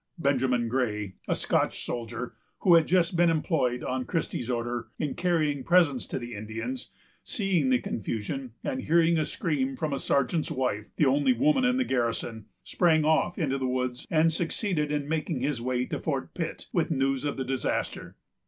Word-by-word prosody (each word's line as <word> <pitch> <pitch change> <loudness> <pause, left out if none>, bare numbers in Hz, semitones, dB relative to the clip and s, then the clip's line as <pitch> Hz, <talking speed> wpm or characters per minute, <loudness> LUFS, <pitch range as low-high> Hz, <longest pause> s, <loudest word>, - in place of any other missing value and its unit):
Benjamin 130 -5 +1
Gray, 105 -5 -1
a - - +1
Scotch - - 0
soldier, 120 +1 -4 0.3
who 180 - +5
had 165 -2 +6
just 175 0 +2
been 170 0 +5
employed, 150 -6 0
on 130 0 -2
Christie's 150 -7 -2
order, 120 -1 -2
in 150 -3 -2
carrying 155 -6 0
presents 165 -7 +3
to - - -3
the 120 -1 -6
Indians, 115 +4 -5 0.3
seeing 185 -10 +1
the 130 - +5
confusion, 115 +4 -4
and 130 - -2
hearing 165 +2 +3
a 155 - +1
scream 145 - -1
from 150 +1 -2
a 135 - -1
sergeant's 140 +5 +1
wife, 125 -5 -1
the 150 - +3
only 145 - +4
woman 270 0 +3
in 250 +1 +3
the 260 - +3
garrison, 115 - -1 0.2
sprang 160 -3 +3
off 160 +3 +2
into 135 -5 0
the 130 - -1
woods 125 0 -2
and 160 0 +3
succeeded 165 -2 -1
in 145 -1 -1
making 155 -3 -1
his 135 -3 -1
way 125 0 0
to - - -4
Fort 140 -4 -3
Pitt 165 -2 -4
with 170 - +1
news 135 -3 +1
of 145 -1 -2
the 130 - -2
disaster. 130 -1 -2
135 Hz, 180 wpm, -28 LUFS, 125-165 Hz, 0.3 s, had